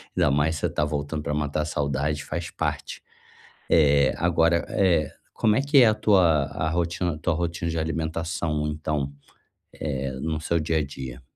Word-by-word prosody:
ainda 75 Hz, -, +3 dB
mais 80 Hz, +3 st, +1 dB
você -, -, 0 dB
está 75 Hz, -, -1 dB
voltando 75 Hz, +1 st, -3 dB
pra 75 Hz, -, -2 dB
matar 75 Hz, 0 st, -1 dB
a -, -, -4 dB
saudade, 75 Hz, 0 st, -1 dB
faz 85 Hz, +2 st, -4 dB
parte, -, -, -3 dB, 0.7 s
eh, 70 Hz, -4 st, +4 dB
agora 85 Hz, 0 st, +2 dB
eh, 85 Hz, -6 st, +2 dB, 0.2 s
como 110 Hz, -1 st, +2 dB
é -, -, +3 dB
que 140 Hz, 0 st, +4 dB
é 120 Hz, -, +8 dB
a 110 Hz, -, +4 dB
tua 80 Hz, -8 st, +2 dB
rotina 85 Hz, -1 st, -1 dB
tua 85 Hz, +1 st, 0 dB
rotina 85 Hz, 0 st, -2 dB
de 80 Hz, -, -3 dB
alimentação, 80 Hz, -1 st, -2 dB
então, 75 Hz, -2 st, -2 dB, 0.6 s
eh, 70 Hz, -2 st, -3 dB
no 80 Hz, -1 st, -2 dB
seu 85 Hz, +1 st, 0 dB
dia 80 Hz, +1 st, 0 dB
a 75 Hz, -, 0 dB
dia? 65 Hz, -2 st, -8 dB
80 Hz, 170 wpm, -25 LUFS, 75-85 Hz, 0.7 s, é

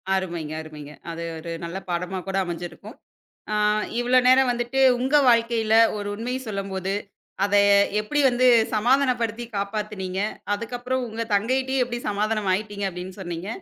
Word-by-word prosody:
அருமைங்க 170 Hz, -5 st, -3 dB
அருமைங்க. 150 Hz, -2 st, -10 dB, 0.2 s
அது 165 Hz, 0 st, -6 dB
ஒரு 165 Hz, +1 st, -7 dB
நல்ல 170 Hz, +3 st, -5 dB
பாடமா 180 Hz, +2 st, -2 dB
கூட 195 Hz, 0 st, -1 dB
அமஞ்சிருக்கும். 175 Hz, -, -7 dB, 0.6 s
அ -, -, +1 dB, 0.4 s
இவ்வளோ 250 Hz, +1 st, +4 dB
நேரம் 260 Hz, 0 st, +5 dB
வந்துட்டு, 240 Hz, +2 st, -2 dB, 0.2 s
உங்க 265 Hz, +4 st, +1 dB
வாழ்க்கையில 230 Hz, -1 st, +2 dB, 0.2 s
ஒரு 205 Hz, 0 st, -4 dB
உண்மை 245 Hz, +4 st, -3 dB
சொல்லும்போது, 195 Hz, -2 st, -3 dB, 0.5 s
அதை 205 Hz, 0 st, +4 dB, 0.4 s
எப்படி 290 Hz, +8 st, -2 dB
வந்து 250 Hz, +1 st, +3 dB, 0.3 s
சமாதானப்படுத்தி 240 Hz, -1 st, +1 dB
காப்பாத்துனீங்க, 200 Hz, -2 st, -3 dB, 0.3 s
அதுக்கப்புறம் 245 Hz, +4 st, -3 dB
உங்க 225 Hz, +1 st, -5 dB
தங்கைட்டயும் 260 Hz, +5 st, +1 dB
எப்படி 240 Hz, 0 st, -4 dB
சமாதானம் 210 Hz, -1 st, -1 dB
ஆயிட்டீங்க 205 Hz, 0 st, -3 dB
அப்படின்னு 180 Hz, +1 st, -7 dB
சொன்னீங்க. 175 Hz, +1 st, -5 dB
210 Hz, 130 wpm, -24 LUFS, 190-245 Hz, 0.6 s, நேரம்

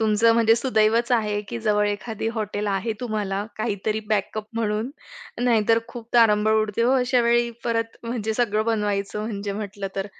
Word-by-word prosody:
तुमचं 220 Hz, +1 st, +4 dB
म्हणजे 225 Hz, -1 st, +5 dB
सुदैवच 235 Hz, -1 st, +2 dB
आहे 210 Hz, -3 st, +1 dB
की 235 Hz, -, -4 dB
जवळ 210 Hz, -1 st, +2 dB
एखादी 220 Hz, +2 st, -3 dB
हॉटेल 210 Hz, -1 st, -3 dB
आहे, 200 Hz, +3 st, -1 dB
तुम्हाला 210 Hz, -4 st, -2 dB
काहीतरी 215 Hz, 0 st, -2 dB
बॅकअप 215 Hz, 0 st, -1 dB
म्हणून. 220 Hz, +2 st, -1 dB, 0.5 s
नाहीतर 225 Hz, -1 st, +3 dB
खूप 235 Hz, -1 st, -9 dB
तारांबळ 215 Hz, -2 st, +5 dB
उडते 215 Hz, +1 st, -1 dB
हो, 250 Hz, +2 st, +3 dB
अशावेळी 240 Hz, -1 st, +2 dB
परत 230 Hz, -1 st, -1 dB
म्हणजे 225 Hz, -2 st, -3 dB
सगळं 215 Hz, -3 st, +1 dB
बनवायचं 210 Hz, -2 st, -1 dB
म्हणजे 200 Hz, -2 st, -4 dB
म्हटलं 200 Hz, -1 st, -5 dB
तर. 195 Hz, +1 st, -2 dB
220 Hz, 155 wpm, -24 LUFS, 210-230 Hz, 0.5 s, म्हणजे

